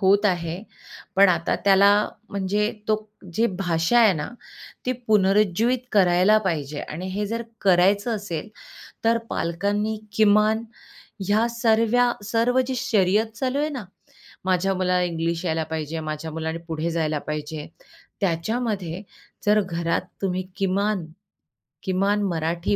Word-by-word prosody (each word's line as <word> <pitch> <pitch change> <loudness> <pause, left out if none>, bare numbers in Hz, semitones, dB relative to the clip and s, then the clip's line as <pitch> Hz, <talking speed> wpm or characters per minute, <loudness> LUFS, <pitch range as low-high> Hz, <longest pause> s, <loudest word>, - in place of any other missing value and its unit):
होत 200 +1 +4
आहे. 170 -2 -1 0.6
पण 195 0 +7
आता 170 -2 +1
त्याला 200 +1 +7 0.4
म्हणजे 205 +1 0 0.2
तो 215 - +4 0.4
जी 230 +1 +3
भाषा 170 +5 +2
आहे 220 -4 +6
ना, 150 -1 -3 0.6
ती 255 - +2
पुनरुज्जीवित 210 +3 +3
करायला 190 +1 +5
पाहिजे 150 -4 -2
आणि 175 +5 -6
हे 205 +2 -2
जर 230 +2 -3 0.2
करायचं 200 +4 +3
असेल 200 -2 -5 0.6
तर 230 0 +4
पालकांनी 205 +6 -1 0.2
किमान 215 +1 +4 0.6
ह्या 215 +3 +3
सर्व्या 235 +1 +2
सर्व 230 +5 +2
जी 260 - -2
शर्यत 215 0 +2
चालू 260 +3 -1
आहे 300 +1 +1
ना, 260 -8 -5 0.6
माझ्या 190 +1 +1
मुलाला 180 -1 +1
इंग्लिश 170 0 -2
यायला 160 -2 0
पाहिजे, 160 0 -3
माझ्या 155 +1 -5
मुलाने 160 +1 -3
पुढे 160 +1 -2
जायला 155 -2 0
पाहिजे 150 0 -4 0.5
त्याच्यामध्ये 195 0 -1 0.4
जर 210 +1 +5
घरात 170 -3 -1 0.2
तुम्ही 185 -1 0
किमान, 195 -1 0 0.8
किमान 195 +2 +1
मराठी 170 +1 -1
195 Hz, 125 wpm, -24 LUFS, 170-215 Hz, 0.8 s, पण